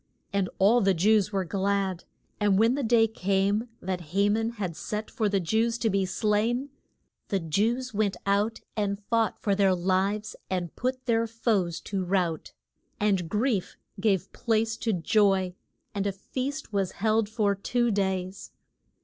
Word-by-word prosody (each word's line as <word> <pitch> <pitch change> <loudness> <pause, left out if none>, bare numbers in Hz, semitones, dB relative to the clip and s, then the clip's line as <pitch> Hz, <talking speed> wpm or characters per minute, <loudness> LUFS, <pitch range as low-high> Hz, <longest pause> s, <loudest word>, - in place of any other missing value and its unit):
And 195 -2 +1
all 220 +5 +5
the 195 -2 +3
Jews 210 +3 +3
were 195 -2 -1
glad; 195 -1 -1 0.3
and 205 -2 +3
when 225 +3 +4
the 285 - -1
day 230 -2 +4
came 200 +2 0
that 180 -2 -4
Ha 200 +1 +4
man 225 +2 +1
had 190 -7 -4
set 210 +6 -4
for 220 -4 0
the 200 -1 +1
Jews 220 +7 +1
to 225 -2 0
be 195 -1 +1
slain, 220 +7 0 0.6
the 195 - 0
Jews 225 +10 0
went 205 -2 0
out 205 +3 +1
and 200 -2 -1
fought 230 -1 +2
for 200 - 0
their 195 -1 +3
lives 195 +4 0
and 180 -3 -3
put 255 +1 -2
their 230 -2 +2
foes 210 -7 0
to 195 -2 -3
rout. 180 -3 -1 0.5
And 195 -5 +1
grief 210 -1 0 0.2
gave 195 -2 +1
place 225 -1 0
to 230 - -1
joy, 190 0 +2 0.4
and 200 0 -1
a - - +1
feast 260 +7 -5
was 195 -2 0
held 215 +1 +1
for 215 -2 +1
two 240 +4 0
days. 190 -1 -2
205 Hz, 160 wpm, -27 LUFS, 190-225 Hz, 0.6 s, all